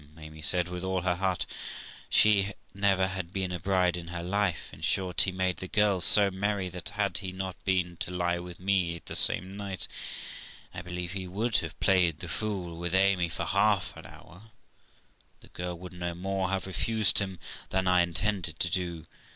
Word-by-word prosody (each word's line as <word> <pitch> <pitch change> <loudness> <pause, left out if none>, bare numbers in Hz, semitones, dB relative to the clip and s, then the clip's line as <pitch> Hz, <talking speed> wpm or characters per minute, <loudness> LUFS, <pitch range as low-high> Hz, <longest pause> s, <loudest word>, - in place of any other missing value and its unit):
Amy 80 0 -11
said, 90 +3 +2
with 90 0 -5
all 95 -1 0
her 90 0 +2
heart; 95 -2 0 0.6
she 100 -1 +4 0.2
never 95 -1 +3
had 95 -2 -4
been 95 -2 -2
a 90 - -3
bride 90 -2 +2
in 85 -1 -6
her 85 0 -5
life. 95 -1 0
In - - -12
short, 90 -2 +1
he 95 - +3
made 95 -1 0
the 95 - -6
girl 105 -2 +2
so 100 +3 +6
merry 100 0 -1
that, 90 -1 -6
had 100 -4 -1
he 95 -2 -5
not 95 -1 -4
been 90 -3 +1
to - - -3
lie 85 -1 0
with 90 0 -9
me 90 -3 +1
the - - -5
same 95 +3 +3
night, 100 -2 -2 0.9
I - - -5
believe 90 0 -5
he 95 -1 -4
would 105 +5 0
have 80 -1 -4
played 90 -5 +3
the 85 - -7
fool 90 -3 -3
with 85 +1 -1
Amy 95 -3 +3
for 85 +1 -3
half 100 0 +2
an - - -10
hour, 90 +2 -14
and 110 0 -18 0.9
the - - -17
girl 90 0 -5
would 90 +1 -9
no 85 -1 -4
more 95 +1 -1
have 95 0 -1
refused 110 +2 +3
him 95 -2 -2 0.3
than 95 0 0
I 90 -1 +5
intended 90 +2 0
to - - +1
do. 85 -3 -2
95 Hz, 195 wpm, -29 LUFS, 90-95 Hz, 0.9 s, so